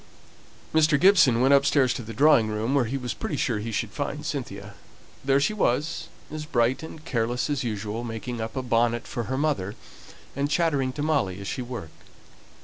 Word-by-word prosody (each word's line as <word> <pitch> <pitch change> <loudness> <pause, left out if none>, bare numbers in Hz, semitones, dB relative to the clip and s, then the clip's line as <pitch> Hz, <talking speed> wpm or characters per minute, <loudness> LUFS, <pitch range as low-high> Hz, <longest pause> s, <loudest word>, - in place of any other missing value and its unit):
Mr. 155 -2 +4
Gibson 175 - +5
went 135 +2 +5
upstairs 140 -2 +4
to - - -5
the 115 0 -8
drawing 140 -4 +5
room, 110 +4 -1
where 140 -4 +3
he 130 +5 -2
was 125 -3 -4
pretty - - -4
sure - - 0
he 115 +2 -4
should 110 -1 -2
find 145 +3 -4
Cynthia. 105 -9 -5 0.5
There 135 0 +3
she 180 +10 +1
was, 150 -6 0 0.2
as 155 0 -5
bright 125 -2 +1
and 160 -1 -10
careless 120 +1 -1
as 145 -3 -1
usual, 110 0 -3
making 115 0 -5
up 110 +4 -5
a 130 - -2
bonnet 120 0 +1
for 120 - -4
her 130 +3 -2
mother, 135 -10 -1 0.6
and 140 +1 -1
chattering 145 -4 +1
to 145 - -3
Molly 135 -12 0
as 100 - -7
she 130 - -3
worked. 120 -10 -8
130 Hz, 190 wpm, -26 LUFS, 115-145 Hz, 0.6 s, Gibson